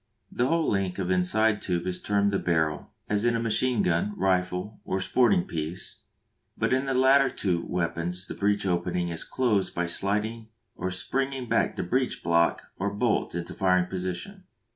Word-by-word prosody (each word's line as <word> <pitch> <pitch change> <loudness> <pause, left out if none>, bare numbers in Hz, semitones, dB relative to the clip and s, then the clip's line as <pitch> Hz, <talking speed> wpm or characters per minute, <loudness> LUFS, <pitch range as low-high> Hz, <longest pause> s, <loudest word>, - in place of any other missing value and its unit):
The 125 - +1
whole 165 +2 +1
length 95 -3 0
of 95 -2 -1
inside 105 +4 +2
tube 90 -2 -1
is 90 -1 -3
termed 100 0 +1
the 100 - +1
barrel, 80 -4 0 0.2
as 105 0 0
in 120 0 +2
a - - 0
machine 115 +1 +1
gun, 90 +4 0
rifle, 95 +2 0
or 95 - -2
sporting 100 -2 +3
piece, 80 +2 -5 0.6
but - - +1
in 130 +1 +1
the 135 - 0
two - - +1
latter 130 -10 +3
weapons 90 +1 -2
the - - -6
breech 100 0 0
opening 90 -1 0
is 85 -1 -4
closed 110 -7 0
by 85 - 0
sliding 105 +5 -1 0.3
or 90 - -3
springing 135 +7 -2
back - - +1
the - - -2
breech 125 +8 -1
block 85 0 +2 0.2
or 100 +2 -1
bolt 105 -3 0
into 85 +1 -4
firing 90 -1 +2
position. 95 - -5
95 Hz, 175 wpm, -27 LUFS, 90-115 Hz, 0.6 s, sporting